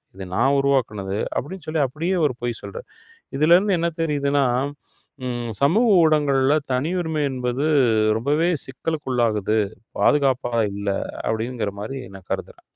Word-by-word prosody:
இதை 95 -1 -7
நான் 135 +4 +3
உருவாக்கியது" 105 -8 0 0.2
அப்படி 175 +9 -3
என்று 160 -4 -18
சொல்லி 155 -2 +1
அப்படியே 165 +8 -2
அவர் 145 -6 +1
பொய் 120 -1 -2
சொல்கிறார். 485 - -8 0.5
இதில் 155 +4 +6
இருந்து 195 0 +2
என்ன 170 - +1
தெரியுது 145 -3 0
என்றால், 135 0 +1 0.5
ம் 120 -1 -3
சமூக 210 +12 +4 0.2
ஊடகங்களில் 145 -1 +2
தனியுரிமை 160 +3 -1
என்பது 125 +1 -2 0.5
ரொம்பவே 150 +7 +1 0.2
சிக்கலுக்குள்ளாகுது. 125 -7 -1 0.4
பாதுகாப்பாக 130 -5 +2 0.2
இல்லை 100 -1 -1 0.3
அப்படி 110 +2 -1
என்கிற 110 -5 -3
மாதிரி 135 +6 -5 0.2
நான் 95 -2 -13
கருதுகிறேன். - - -5
135 Hz, 135 wpm, -22 LUFS, 120-155 Hz, 0.5 s, இதில்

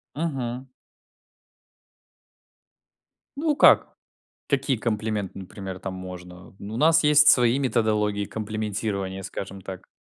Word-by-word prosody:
Мгм. 130 -5 -4 2.7
Ну 300 -1 0
как, - - +5 0.5
какие 135 -1 +1
комплименты, 110 -3 -3
например, 95 0 -8
там 95 0 -5
можно? 90 0 -10
Ну 105 +2 -8
у - - -3
нас 160 +5 +4
есть 150 0 +6
свои 120 +1 +5
методологии 105 -5 0
комплиментирования, 105 -3 -4
скажем 95 0 -7
так. 95 0 -9
110 Hz, 100 wpm, -25 LUFS, 95-130 Hz, 2.7 s, есть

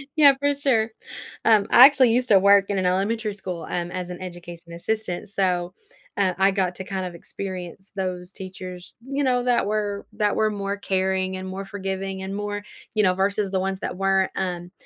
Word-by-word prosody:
yeah, 290 -3 +7
for 285 0 +1
sure. 250 -6 +1 0.6
Um, 215 -2 +5
I 250 - +10
actually 265 -4 +5
used 250 +2 +1
to 200 - +7
work 200 +1 +6
in 200 - 0
an 190 - 0
elementary 205 +4 0
school, 185 -4 -6
um, 175 0 -2
as 180 -1 -4
an 180 0 -7
education 175 -2 -9
assistant, 205 +1 -3
so, 180 -3 0 0.4
uh, 185 -2 +2
I 195 +1 +4
got 185 -2 0
to 190 - -6
kind 190 0 -4
of 175 -1 -7
experience 185 +1 -7
those 185 -1 -4
teachers, 185 -2 -9
you 280 +1 -1
know, 250 -2 +2
that 245 -3 +2
were 205 -1 -2
that 210 -1 +1
were 215 - +2
more 200 -1 -3
caring, 190 -1 -1
and 185 0 -6
more 190 +1 -5
forgiving, 195 -1 -4
and 190 +1 -4
more 205 0 -4 0.3
you 215 - +2
know, 185 -2 +4
versus 200 +1 0
the 190 - +1
ones 190 0 -2
that - - -4
weren't, 195 0 +2
um, 180 -2 -3
195 Hz, 200 wpm, -24 LUFS, 185-210 Hz, 0.6 s, I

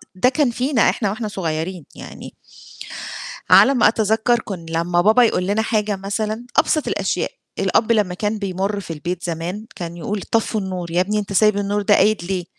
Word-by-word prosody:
ده 250 +7 +3
كان 275 -3 +1
فينا 250 0 +2
إحنا 205 -4 -1
وإحنا 215 +1 -3
صغيّرين 170 -3 -4
يعني - - -10 1.2
على 275 - +7
ما 245 - +5
أتذكَّر 220 +2 +1
كن 180 -5 -7
لمّا 170 +1 +1
بابا 220 +7 +5
يقول 180 -5 +1
لنا 210 +2 +1
حاجة 210 -3 0
مثلًا، 215 +4 -3
أبسَط 310 - +2
الأشياء، - - -1 0.3
الأب 230 +1 +2
لمّا 205 -5 +1
كان 210 +3 -2
بيمُر 200 +1 -2
في 165 -3 -7
البيت 175 +3 -4
زمان 175 +6 -4
كان 170 -1 -6
يقول: 200 +4 -4
"طفّوا 225 -1 0
النور، 180 -3 -5
يا 175 - +1
ابني 210 +3 0
أنت 200 -1 -4
سايب 215 +1 +4
النور 205 +1 -1
ده 205 0 +4
قايد 210 -4 +3
ليه؟" 180 -1 -2
205 Hz, 180 wpm, -20 LUFS, 180-220 Hz, 1.2 s, على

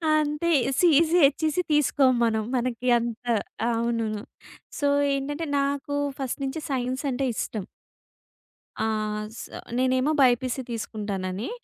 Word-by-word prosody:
అంతే. 305 +2 0 0.3
CEC, 335 0 +5
HEC 310 +4 +1
తీసుకోం 280 -3 +4
మనం. 220 -1 +1
మనకి 250 0 -2
అంత 235 +1 -5 0.5
అవును. 230 0 0 0.7
సో 290 - +2 0.3
ఏంటంటే 290 +4 -2
నాకు 280 +1 -1 0.2
ఫస్ట్ 265 +1 -3
నుంచి 270 +4 -3
సైన్స్ 255 +1 -2
అంటే 265 +2 -1
ఇష్టం. 215 -4 -3 1.2
ఆ! 220 - +1 0.5
స - - -6 0.4
నేనేమో 260 +3 +2
బైపీసీ 255 0 +3
తీసుకుంటానని, 205 - -4
260 Hz, 110 wpm, -26 LUFS, 235-290 Hz, 1.2 s, CEC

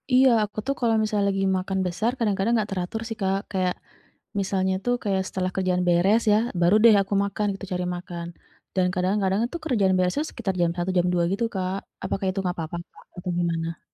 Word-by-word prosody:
Iya, 260 +1 +7 0.2
aku 210 - -17
tuh 275 - +1
kalau 230 -2 +2
misalnya 210 -2 +1
lagi 195 0 0
makan 190 +1 -2
besar 215 +7 0
kadang-kadang 210 0 +1
nggak 215 -2 0
teratur 190 +3 -3
sih, 225 -1 -5
Kak. 195 0 +1
Kayak, 185 -2 +1 0.7
misalnya 190 -1 0
itu 220 +6 -2
kayak 195 -3 +1
setelah 185 -1 -2
kerjaan 185 -1 +1
beres 190 +6 +4
ya, - - +6 0.2
baru 175 +3 +4
deh 230 -2 +9
aku 195 +1 -3
makan 200 +1 -2
gitu, 195 - -8
cari 180 0 -1
makan. 175 -1 -7 0.5
Dan 185 -1 +2
kadang-kadang 190 +1 +1
itu 340 - -6
kerjaan 205 -11 +2
beresnya 185 +12 +1
sekitar 190 - -3
jam 170 -1 +3
1, 175 +1 -1
jam 175 0 +3
2 175 -1 +2
gitu, 200 +4 0
Kak. 185 0 -1 0.3
Apakah 195 - -2
itu 190 - -5
nggak 180 -1 -1
apa-apa, 165 0 -4 0.2
Kak, - - -17
atau 180 0 -4
gimana? 165 -1 -1
190 Hz, 200 wpm, -25 LUFS, 180-210 Hz, 0.7 s, deh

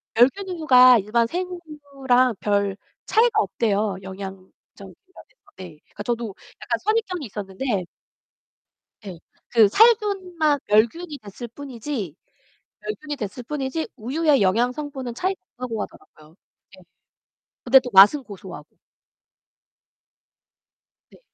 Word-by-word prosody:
멸균 270 - +3
우유가 255 -8 +6
일반 230 +3 0
생우유랑 285 - -1
별 200 -1 0 0.3
차이가 450 -1 +3
없대요 210 - -1
영양적인 190 0 -8 0.4
면에서. - - -12 0.6
네. 190 - -9 0.2
그러니까 205 - -10
저도 230 -4 -3 0.3
약간 - - -1
선입견이 405 -7 -1
있었는데 200 -1 -4 1.2
예, 185 -4 -8 0.3
그 225 -3 +5
살균만 380 - +3
멸균이 280 +10 +1
됐을 210 +4 -9
뿐이지 240 - -6 0.7
멸균이 305 -8 -6
됐을 240 0 -6
뿐이지 285 +3 -4
우유의 280 +5 +1
영양 225 +6 +2
성분은 270 -4 -6
차이가 375 +8 -2 0.2
없다고 230 -4 -4
하더라고요, 155 -3 -13 0.4
예 - - -17 0.8
근데 260 +2 +7
또 250 - -7
맛은 200 +9 +7
고소하고. 205 -4 -11 2.3
네. - - -19
250 Hz, 260 characters per minute, -23 LUFS, 210-305 Hz, 2.3 s, 근데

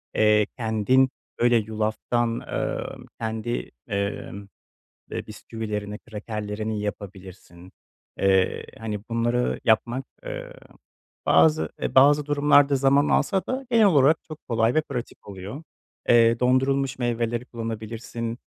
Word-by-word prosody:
Eee, 105 -1 +4
kendin 120 +3 +2 0.3
böyle 120 0 +4
yulaftan, 110 +2 -1
emm, - - -4
kendi, 110 +1 -3 0.2
emm, 100 0 -4 0.6
eee, - - -5
bisküvilerini, 105 -2 -5
krakerlerini 105 -1 -5
yapabilirsin. 95 -3 -8 0.5
Eee, 95 -1 +2
hani, 110 -2 -4
bunları 120 +1 0
yapmak, 120 +3 +1 0.2
eee, - - -6 0.7
bazı, 155 -1 +4
eee, - - -3
bazı 145 +2 +6
durumlarda 145 -1 +4
zaman 140 +2 +3
alsa 190 -1 +2
da 260 +1 -3
genel 225 -2 +5
olarak 155 -3 +4
çok 155 -1 -12
kolay 115 0 +2
ve 155 - +3
pratik 125 -5 -7
oluyor. 100 - -8 0.5
Eee, 115 0 +5
dondurulmuş 135 +1 +1
meyveleri 120 0 -1
kullanabilirsin, 115 0 -5
115 Hz, 110 wpm, -25 LUFS, 105-135 Hz, 0.7 s, bazı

